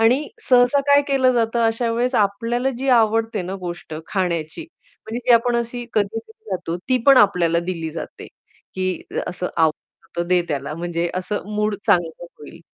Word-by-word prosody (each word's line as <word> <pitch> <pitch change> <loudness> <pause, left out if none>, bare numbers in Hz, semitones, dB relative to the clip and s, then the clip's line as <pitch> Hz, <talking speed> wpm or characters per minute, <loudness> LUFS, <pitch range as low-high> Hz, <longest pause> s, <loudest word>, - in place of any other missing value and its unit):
आणि 255 +6 +3 0.2
सहसा 250 +2 +5
काय 285 0 +6
केलं 260 -2 +3
जातं 235 0 +1
अशा 230 +1 0
वेळेस 245 +2 0
आपल्याला 230 +6 0
जी 270 +1 -3
आवडते 225 -3 +2
ना 185 +2 -5
गोष्ट 175 -3 -6
खाण्याची 175 - -2
म्हणजे 325 - -10
जी 245 - +6
आपण 235 +1 +2
अशी 235 +1 -3
कधीतरी 225 - -3
खातो, 170 -1 -3
ती 255 - +3
पण 275 -1 +8
आपल्याला 175 -5 +3
दिली 165 -3 -3
जाते, 165 - -8 0.5
की 185 -1 -2 0.2
असं 180 0 -4
आवडतं 165 +1 -2
दे 180 -1 +4
त्याला 140 +1 -3
म्हणजे 170 0 -2
असं 185 +3 -3
मूड 210 0 +1
चांगलं 175 -5 +1
होईल. 165 +3 -12
215 Hz, 160 wpm, -21 LUFS, 175-245 Hz, 0.5 s, पण